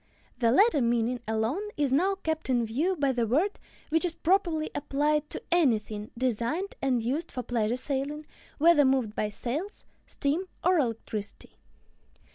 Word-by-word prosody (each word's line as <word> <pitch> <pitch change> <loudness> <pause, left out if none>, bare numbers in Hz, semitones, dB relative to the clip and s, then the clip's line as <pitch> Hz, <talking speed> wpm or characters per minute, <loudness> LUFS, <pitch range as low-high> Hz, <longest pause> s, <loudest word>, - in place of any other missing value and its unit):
The 230 -2 +3
latter 385 - +4
meaning 235 +1 +1
alone 220 - 0 0.2
is 285 -3 +1
now 370 +9 +3
kept 320 -6 -3
in 240 -2 +2
view 300 +12 0
by 280 -4 +1
the 240 -3 0
word, 325 - +1 0.3
which 325 +2 +2
is 345 -2 -1
properly 340 -3 +1
applied 295 +1 0
to - - -6
anything 220 -10 +1
designed 255 - -1
and 255 -4 +1
used 290 +8 -2
for 250 - -4
pleasure 230 -1 0
sailing, 280 +3 -3 0.3
whether 320 -1 +6
moved 260 -5 +2
by 210 -1 -1
sails, 290 - -4 0.2
steam, 300 +7 -1 0.2
or 365 -1 +4
electricity. 225 -5 -4
275 Hz, 150 wpm, -28 LUFS, 235-320 Hz, 0.3 s, whether